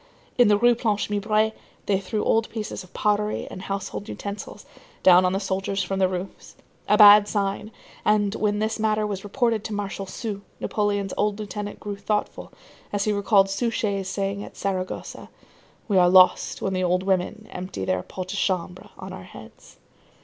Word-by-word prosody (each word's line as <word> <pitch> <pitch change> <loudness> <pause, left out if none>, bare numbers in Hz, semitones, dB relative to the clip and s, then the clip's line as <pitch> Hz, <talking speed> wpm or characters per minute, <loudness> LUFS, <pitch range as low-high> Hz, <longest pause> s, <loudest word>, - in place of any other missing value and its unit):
In 245 - +5
the 205 0 +5
Rue 240 +3 +5
Planche 215 -3 -1
Mibray, 215 +1 +1 0.3
they 195 -2 +1
threw 210 +3 -3
old 225 0 +2
pieces 215 -3 -5
of 185 - -17
pottery 210 0 0
and 185 - -7
household 195 +2 -5
utensils 200 0 -7 0.4
down 185 0 +7
on 180 - +1
the 195 - 0
soldiers 195 0 -2
from 195 0 -3
the 190 - +4
roofs; 185 +1 -7 0.3
a 210 - +5
bad 210 -1 +9
sign; 205 0 -2 0.3
and 210 -1 +2
when 210 -1 0
this 220 +1 -1
matter 215 -1 +1
was 200 -2 -4
reported 225 +1 0
to 220 - -5
Marshal 200 -1 -4
Soult, 200 +1 -5 0.2
Napoleon's 205 -2 -1
old 205 -1 +1
lieutenant 210 -1 -6
grew 205 -1 -5
thoughtful, 210 +1 -3 0.4
as 205 -1 0
he 215 - +1
recalled 200 -1 +3
Suchet's 200 -3 -1
saying 200 +1 -2
at - - -12
Saragossa: 185 -2 -4 0.6
"We 200 -4 +3
are 180 0 +5
lost 185 0 +4
when 190 - -1
the 185 0 0
old 180 +1 +1
women 195 +3 -1
empty 180 - -5
their 95 -1 0
pots 185 - -7
de 200 - -2
chambre 180 -1 -2
on - - -8
our - - -9
heads." - - -14
200 Hz, 180 wpm, -24 LUFS, 190-210 Hz, 0.6 s, bad